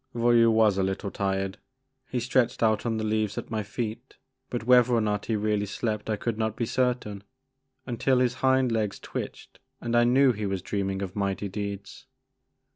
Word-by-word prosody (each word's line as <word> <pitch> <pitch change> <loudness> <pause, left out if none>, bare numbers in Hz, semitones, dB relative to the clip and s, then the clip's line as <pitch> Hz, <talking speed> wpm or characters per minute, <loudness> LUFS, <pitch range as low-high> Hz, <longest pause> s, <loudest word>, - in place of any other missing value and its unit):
Voyou 120 -1 +5
was 110 -3 +4
a - - +2
little 95 +1 -2
tired. 95 -1 -2 0.5
He 125 - -1
stretched 120 0 +1
out 110 +1 +2
on 115 -1 0
the 110 - -2
leaves 110 -1 0
at - - -5
my 110 -1 -1
feet 110 +2 -5 0.3
but - - -3
whether 125 0 +5
or - - +3
not 105 -2 -1
he 115 - +1
really 105 -1 0
slept 105 +1 -3
I 110 - +1
could 115 +1 -3
not 110 -1 -1
be 120 - -1
certain, 120 -5 -1 0.6
until 130 +1 +1
his 125 -1 +2
hind 130 -1 +3
legs 110 -3 -1
twitched - - -7 0.2
and 120 0 -2
I 120 - +5
knew 130 +2 +5
he 105 -3 -3
was 95 -2 -3
dreaming 95 -1 -2
of 95 -2 -6
mighty 100 0 -1
deeds. 100 0 -6
110 Hz, 190 wpm, -27 LUFS, 100-120 Hz, 0.6 s, Voyou